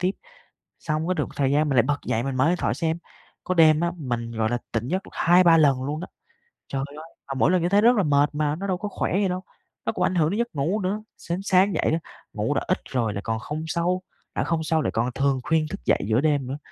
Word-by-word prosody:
tiếp, 180 Hz, +1 st, +2 dB, 0.7 s
xong 155 Hz, +1 st, -2 dB
cái 185 Hz, -, +2 dB
được -, -, 0 dB
một -, -, -9 dB
thời 135 Hz, -2 st, +1 dB
gian 150 Hz, +1 st, +2 dB
mình 135 Hz, -, +1 dB
lại 120 Hz, -, +7 dB
bật 145 Hz, +1 st, 0 dB
dậy, 115 Hz, -, 0 dB
mình 135 Hz, 0 st, -3 dB
mở 130 Hz, +3 st, +3 dB
điện 180 Hz, -, +2 dB
thoại -, -, 0 dB
xem, 165 Hz, 0 st, -1 dB, 0.5 s
có 185 Hz, -, -1 dB
đêm 160 Hz, -3 st, +6 dB
á 170 Hz, 0 st, 0 dB
mình, 120 Hz, -5 st, -3 dB
gọi 110 Hz, -1 st, 0 dB
là, 120 Hz, -, 0 dB
tỉnh 115 Hz, 0 st, -1 dB
giấc 185 Hz, +5 st, -1 dB
được -, -, -13 dB
2,3 175 Hz, -1 st, +5 dB
lần 140 Hz, -4 st, +4 dB
luôn 150 Hz, +3 st, -3 dB
đó. 180 Hz, -, -5 dB, 0.6 s
Trời 135 Hz, -1 st, -2 dB
ơi! 155 Hz, -, -9 dB, 0.2 s
Mà 135 Hz, -, -4 dB
mỗi 145 Hz, -, +3 dB
lần 185 Hz, -1 st, +3 dB
như 175 Hz, -, +1 dB
thế 200 Hz, +2 st, +4 dB
rất 240 Hz, +2 st, +6 dB
là 200 Hz, -, +3 dB
mệt 145 Hz, -1 st, +3 dB
mà, 150 Hz, 0 st, 0 dB
nó 195 Hz, +5 st, -5 dB
đâu 185 Hz, -, 0 dB
có 210 Hz, +3 st, -4 dB
khỏe -, -, -2 dB
gì 200 Hz, -, +2 dB
đâu, 185 Hz, 0 st, -3 dB, 0.4 s
nó -, -, +1 dB
cũng -, -, -2 dB
ảnh 185 Hz, -, +1 dB
hưởng 160 Hz, -3 st, +3 dB
đến 200 Hz, -, -2 dB
giấc 235 Hz, -6 st, -2 dB
ngủ 170 Hz, +10 st, 0 dB
nữa. 205 Hz, +3 st, -2 dB
Sến 175 Hz, +2 st, -4 dB
sáng 190 Hz, 0 st, +3 dB
dậy -, -, +1 dB
á, 165 Hz, -, +1 dB, 0.3 s
ngủ -, -, -1 dB
đã -, -, 0 dB
ít -, -, +1 dB
rồi 115 Hz, -5 st, 0 dB
lại 100 Hz, -, -4 dB
còn 110 Hz, -1 st, -1 dB
không 150 Hz, +7 st, -5 dB
sâu, 175 Hz, +3 st, 0 dB, 0.3 s
đã -, -, 0 dB
không 165 Hz, -1 st, -1 dB
sâu 160 Hz, 0 st, +1 dB
lại -, -, -1 dB
còn 120 Hz, +3 st, 0 dB
thường 135 Hz, -1 st, +1 dB
khuyên 160 Hz, +1 st, +1 dB
thức 195 Hz, -, -8 dB
dậy -, -, +3 dB
giữa 115 Hz, +3 st, +2 dB
đêm 145 Hz, -4 st, +1 dB
nữa. 135 Hz, +3 st, -4 dB
155 Hz, 280 wpm, -24 LUFS, 135-180 Hz, 0.7 s, lại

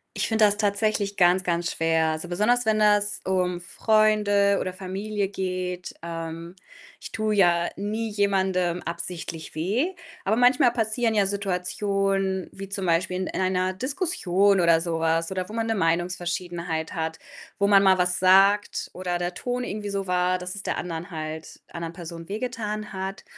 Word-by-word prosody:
Ich -, -, 0 dB
finde 220 Hz, -1 st, +2 dB
das 205 Hz, 0 st, +4 dB
tatsächlich 205 Hz, -1 st, 0 dB
ganz, 180 Hz, 0 st, +4 dB
ganz 175 Hz, 0 st, 0 dB
schwer. 165 Hz, 0 st, +1 dB
Also, 155 Hz, +2 st, -3 dB
besonders, 210 Hz, +7 st, +1 dB
wenn 215 Hz, -1 st, +2 dB
das 205 Hz, -1 st, +2 dB
um 180 Hz, -2 st, 0 dB
Freunde 210 Hz, 0 st, +3 dB
oder 185 Hz, -, -3 dB
Familie 195 Hz, +2 st, -3 dB
geht. 185 Hz, -2 st, -4 dB
Ähm, 165 Hz, 0 st, -6 dB, 0.5 s
ich -, -, -10 dB
tue 215 Hz, -1 st, 0 dB
ja 175 Hz, -4 st, +3 dB
nie 215 Hz, +3 st, -2 dB
jemandem 190 Hz, -4 st, +1 dB
absichtlich 170 Hz, -2 st, -6 dB
weh, 225 Hz, -, 0 dB, 0.3 s
aber 205 Hz, +3 st, +2 dB
manchmal 245 Hz, 0 st, +5 dB
passieren 225 Hz, 0 st, 0 dB
ja 205 Hz, -2 st, +4 dB
Situationen, 195 Hz, 0 st, -1 dB
wie 195 Hz, 0 st, -8 dB
zum 195 Hz, 0 st, -4 dB
Beispiel 180 Hz, +2 st, +1 dB
in 185 Hz, -, -2 dB
in -, -, -4 dB
einer 185 Hz, 0 st, +1 dB
Diskussion 200 Hz, -, +1 dB
oder 170 Hz, -2 st, +4 dB
so 165 Hz, -1 st, -2 dB
was 165 Hz, +1 st, +1 dB
oder 185 Hz, -1 st, -3 dB
wo 210 Hz, -, -10 dB
man 225 Hz, 0 st, -1 dB
'ne 225 Hz, -, 0 dB
Meinungsverschiedenheit 175 Hz, -2 st, -2 dB
hat, 160 Hz, 0 st, -3 dB, 0.4 s
wo 200 Hz, -, +2 dB
man 200 Hz, -1 st, +6 dB
mal 190 Hz, -1 st, +5 dB
was 180 Hz, 0 st, +1 dB
sagt 195 Hz, +3 st, +4 dB
oder 180 Hz, -1 st, -2 dB
der 175 Hz, 0 st, -3 dB
Ton 245 Hz, +6 st, -3 dB
irgendwie 210 Hz, -3 st, -4 dB
so 195 Hz, -1 st, -3 dB
war, 180 Hz, 0 st, +2 dB
dass 180 Hz, +1 st, -6 dB
es 200 Hz, -, -7 dB
der -, -, -2 dB
anderen 170 Hz, -1 st, -5 dB
halt 155 Hz, -1 st, -7 dB
anderen 170 Hz, -1 st, -5 dB
Person 165 Hz, -1 st, -8 dB
wehgetan 215 Hz, -1 st, -4 dB
hat 190 Hz, +1 st, -5 dB
190 Hz, 165 wpm, -25 LUFS, 175-205 Hz, 0.5 s, man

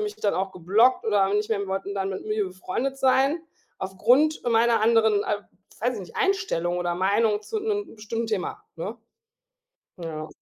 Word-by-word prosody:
mich 420 Hz, 0 st, -3 dB
dann 205 Hz, -, 0 dB
auch 190 Hz, 0 st, -2 dB
geblockt 210 Hz, +9 st, +3 dB
oder 210 Hz, -3 st, +3 dB
haben 200 Hz, +2 st, +1 dB
nicht 210 Hz, +1 st, -3 dB
mehr 200 Hz, -2 st, 0 dB
wollten 195 Hz, +1 st, -3 dB
dann 195 Hz, -1 st, -1 dB
mit 190 Hz, -, -5 dB
mir 215 Hz, -1 st, 0 dB
befreundet 185 Hz, +9 st, -3 dB
sein 270 Hz, +5 st, +3 dB, 0.4 s
aufgrund 250 Hz, +11 st, +2 dB
meiner 230 Hz, 0 st, +3 dB
anderen, 220 Hz, -2 st, +4 dB
äh, 210 Hz, -, 0 dB, 0.4 s
weiß 245 Hz, +2 st, +1 dB
ich 215 Hz, -, -5 dB
nicht, 185 Hz, -, -11 dB
Einstellung 385 Hz, -, 0 dB
oder 175 Hz, -1 st, -1 dB
Meinung 205 Hz, +4 st, +2 dB
zu 445 Hz, -, -3 dB
'nem 410 Hz, -1 st, -2 dB
bestimmten 225 Hz, +2 st, -3 dB
Thema, 210 Hz, -4 st, -3 dB
ne? 200 Hz, +7 st, -5 dB, 1.0 s
Ja. 160 Hz, -3 st, -5 dB
210 Hz, 175 wpm, -25 LUFS, 190-250 Hz, 1.0 s, anderen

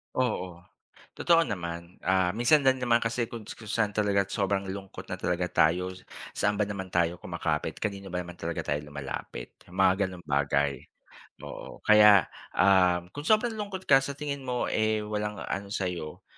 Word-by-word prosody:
Oo. 90 Hz, -8 st, -2 dB, 0.5 s
Totoo 165 Hz, -1 st, +4 dB
naman, 85 Hz, -3 st, -5 dB
ah, 95 Hz, 0 st, +2 dB
minsan 120 Hz, +7 st, +5 dB
din 130 Hz, 0 st, +5 dB
naman 120 Hz, -1 st, +3 dB
kasi 115 Hz, +1 st, -1 dB
kuns 110 Hz, -2 st, -8 dB
kung 110 Hz, -, -12 dB
saan 105 Hz, -3 st, +1 dB
talaga 100 Hz, -2 st, +2 dB
sobrang 100 Hz, -1 st, 0 dB
lungkot 95 Hz, 0 st, -7 dB
na -, -, -1 dB
talaga 90 Hz, 0 st, 0 dB
tayo 90 Hz, +4 st, +2 dB
s 95 Hz, -, -15 dB, 0.3 s
saan 105 Hz, 0 st, +1 dB
ba -, -, +4 dB
naman 100 Hz, -2 st, -5 dB
tayo 85 Hz, -1 st, +1 dB
kumakapit? 80 Hz, -3 st, -2 dB
Kanino 100 Hz, -2 st, -3 dB
ba 90 Hz, -, -2 dB
naman 90 Hz, 0 st, -10 dB
talaga 85 Hz, 0 st, -3 dB
tayo 75 Hz, 0 st, -1 dB
lumalapit? 70 Hz, -2 st, -6 dB
Yung 90 Hz, -, -14 dB
mga 95 Hz, +1 st, +4 dB
ganung 90 Hz, -1 st, -10 dB
bagay. 70 Hz, 0 st, +1 dB, 0.6 s
Oo -, -, -9 dB
kaya, 105 Hz, -2 st, +7 dB, 0.3 s
uhm, 90 Hz, -2 st, +4 dB
kung 145 Hz, -, -5 dB
sobrang 220 Hz, +1 st, +3 dB
lungkot 195 Hz, -2 st, -5 dB
ka 135 Hz, -1 st, +7 dB
sa 140 Hz, +1 st, -4 dB
tingin 140 Hz, -2 st, -4 dB
mo, 125 Hz, -1 st, -1 dB
eh, 110 Hz, 0 st, +1 dB
walang 105 Hz, 0 st, -3 dB
ano 100 Hz, 0 st, -4 dB
sayo 90 Hz, -6 st, -4 dB
100 Hz, 170 wpm, -28 LUFS, 90-115 Hz, 0.6 s, kaya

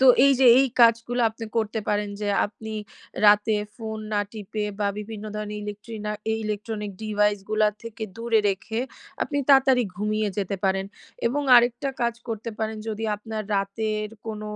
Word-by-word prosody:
তো 265 Hz, -, +6 dB, 0.2 s
এই 280 Hz, -, +6 dB
যে 260 Hz, -, +6 dB
এই 270 Hz, -, +4 dB
কাজগুলো 235 Hz, +1 st, +4 dB
আপনি 225 Hz, +1 st, -8 dB
করতে 220 Hz, 0 st, 0 dB
পারেন 205 Hz, 0 st, 0 dB
যে, 205 Hz, -, -1 dB, 0.2 s
আপনি 220 Hz, +1 st, -9 dB, 0.5 s
রাতে 210 Hz, +1 st, +5 dB, 0.2 s
ফোন 220 Hz, -2 st, -5 dB
না 205 Hz, -, +2 dB
টিপে 210 Hz, 0 st, -4 dB, 0.2 s
বা 205 Hz, -, +2 dB
বিভিন্ন 210 Hz, 0 st, -7 dB
ধরনের 210 Hz, 0 st, -4 dB
ইলেক্ট্রিনা 210 Hz, +1 st, -5 dB, 0.3 s
ইলেকট্রনিক 210 Hz, -1 st, -4 dB
ডিভাইস 210 Hz, -1 st, +2 dB
গুলা 215 Hz, 0 st, +4 dB
থেকে, 230 Hz, -1 st, -8 dB
দূরে 230 Hz, -1 st, +2 dB
রেখে, 220 Hz, +4 st, -2 dB, 0.4 s
আপনি 285 Hz, -1 st, -1 dB
তাড়াতাড়ি 270 Hz, -2 st, +6 dB
ঘুমিয়ে 210 Hz, +1 st, 0 dB
যেতে 195 Hz, 0 st, -1 dB
পারেন। 195 Hz, 0 st, +1 dB, 0.4 s
এবং 285 Hz, +5 st, 0 dB
আরেকটা 240 Hz, +3 st, +3 dB
কাজ 235 Hz, -1 st, +1 dB
করতে 225 Hz, 0 st, -4 dB
পারেন 220 Hz, 0 st, -2 dB
যদি 220 Hz, +1 st, -3 dB
আপনার 215 Hz, +1 st, -5 dB
রাতের 215 Hz, +2 st, -1 dB, 0.2 s
কোন 215 Hz, -1 st, -4 dB
215 Hz, 155 wpm, -25 LUFS, 210-230 Hz, 0.5 s, তো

